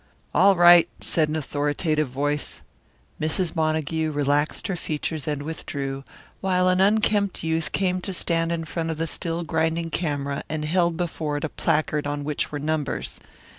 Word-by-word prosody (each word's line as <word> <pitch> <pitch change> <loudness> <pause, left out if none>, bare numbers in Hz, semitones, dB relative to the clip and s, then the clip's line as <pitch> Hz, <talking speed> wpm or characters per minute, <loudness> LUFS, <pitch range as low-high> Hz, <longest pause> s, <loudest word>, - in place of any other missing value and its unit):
"All 195 +2 +6
right," 175 -1 +7
said 155 -2 +1
an 155 - -2
authoritative 150 +1 0
voice. 145 +3 -2 0.6
Mrs. 160 +3 0
Montague 160 0 0
relaxed 145 0 0
her 195 - -1
features 155 -2 -3
and 145 -1 -2
withdrew, 140 -3 -4 0.4
while 185 -1 +2
an 185 +1 +3
unkempt 205 -1 +2
youth 160 0 0
came 185 -1 0
to 195 - -3
stand 165 -2 +1
in 165 -1 -2
front 165 +2 -3
of 160 - -2
the 165 - 0
still 165 +1 -2
grinding 160 +1 0
camera 140 -4 -2
and 155 -1 -2
held 170 +1 +1
before 160 -4 -2
it 145 - -5
a 160 - -1
placard 150 -1 0
on 145 0 -3
which 150 0 -1
were 150 - -3
numbers. 150 -1 -2
160 Hz, 165 wpm, -24 LUFS, 150-170 Hz, 0.6 s, right